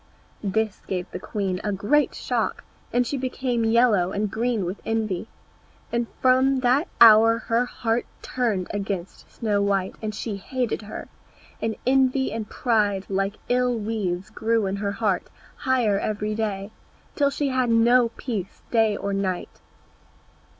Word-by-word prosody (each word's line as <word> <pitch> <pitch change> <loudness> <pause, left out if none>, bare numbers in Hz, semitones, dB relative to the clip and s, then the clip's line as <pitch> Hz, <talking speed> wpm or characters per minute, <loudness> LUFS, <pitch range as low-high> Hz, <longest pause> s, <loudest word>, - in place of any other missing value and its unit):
This 215 +1 -1
gave 180 -1 -3
the 180 - -5
queen 195 -2 -3
a 210 - -1
great 210 +10 +2
shock, - - -2 0.3
and 245 0 +2
she 280 - -2
became 255 -2 -1
yellow 225 -5 +3
and 205 0 -1
green 230 -3 0
with 180 +3 -5
envy, 220 -3 -2 0.6
and 235 0 0 0.2
from 260 +1 +4
that 265 +7 +3
hour 225 0 +8
her 230 +1 0
heart 230 -1 -1 0.2
turned 225 -8 -1
against 195 -3 -4
Snow 210 -3 0
white, 195 -2 0
and 215 -1 -3
she 210 -1 -4
hated 245 +2 -2
her. 210 - -8 0.5
And 225 -1 -1
envy 265 0 +3
and 220 -1 -4
pride 205 -5 +1
like 195 +1 0
ill 250 -1 +2
weeds 205 -3 -3
grew 225 -1 +1
in 195 +1 -2
her 200 0 -2
heart 200 -3 0 0.3
higher 240 -7 +1
every 210 0 -2
day, 210 -2 -3 0.4
until 285 -1 +2
she 280 0 -1
had 255 -2 +1
no 235 +1 +5
peace 210 -7 -5
day 220 -3 +3
or 200 - -3
night. 190 -2 -3
220 Hz, 150 wpm, -24 LUFS, 200-245 Hz, 0.6 s, hour